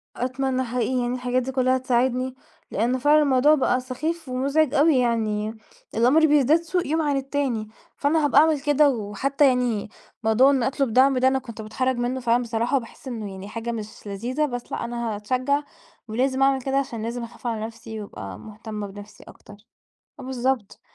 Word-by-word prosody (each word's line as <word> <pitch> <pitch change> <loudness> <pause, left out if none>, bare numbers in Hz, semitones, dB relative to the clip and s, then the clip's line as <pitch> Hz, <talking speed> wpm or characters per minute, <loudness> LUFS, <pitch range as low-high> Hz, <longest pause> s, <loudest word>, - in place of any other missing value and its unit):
أتمنى 260 +1 -1
حقيقي 250 0 -1
إن 240 - -1
الحاجات 250 0 0
دي 265 - -4
كلها 255 0 +2
تساعدني، 255 0 0 0.4
لأن 240 +5 +1
فعلًا 295 +3 +4
الموضوع 285 +1 +4
بقى 255 -3 +1
سخيف 290 +5 -4
ومزعج 275 +3 +1
أوي 300 -1 +4
يعني، 220 -3 0 0.4
الأمر 255 +8 +5
بيزداد 300 +2 +4
سوء 350 0 -2
يوم 320 +2 +1
عن 290 -3 +1
التاني، 270 -5 -2 0.3
فأنا 300 +2 +2
هابقى 290 - +5
أعمل 310 -3 +2
كده 290 0 +4
وحتى 265 +5 +1
يعني 245 -5 0 0.3
موضوع 225 +5 +5
إن 265 -3 +1
أطلب 265 -1 0
دعم 265 +2 +5
ده 255 +1 +4
أنا 265 0 +2
كنت 230 -4 -9
باتحرج 255 +4 -1
منه 245 +2 -1
فعلًا 240 0 +2
بصراحة، 235 +3 0
باحس 235 +2 -13
إنه 220 -5 -5
يعني 190 +1 -8
حاجة 230 +2 -4
مش 215 -2 -7
لذيذة، 240 +9 -1
بس 245 -4 -6
لا - - -3
أنا 235 -2 -3
هاتشجع 255 +7 0 0.4
ولازم 260 +4 0
أعمل 270 -1 +3
كده 270 +1 -1
عشان 240 -5 -2
لازم 235 +1 -4
أخاف 240 +1 -8
على 220 -2 -2
نفسي 225 -1 -8
وأبقى 100 - -8
مهتمة 215 -1 -7
بنفسي 205 +2 -12
أكتر، 205 - -14 0.7
آه - - -8
بالضبط، 255 -4 -2
255 Hz, 180 wpm, -24 LUFS, 230-275 Hz, 0.7 s, الأمر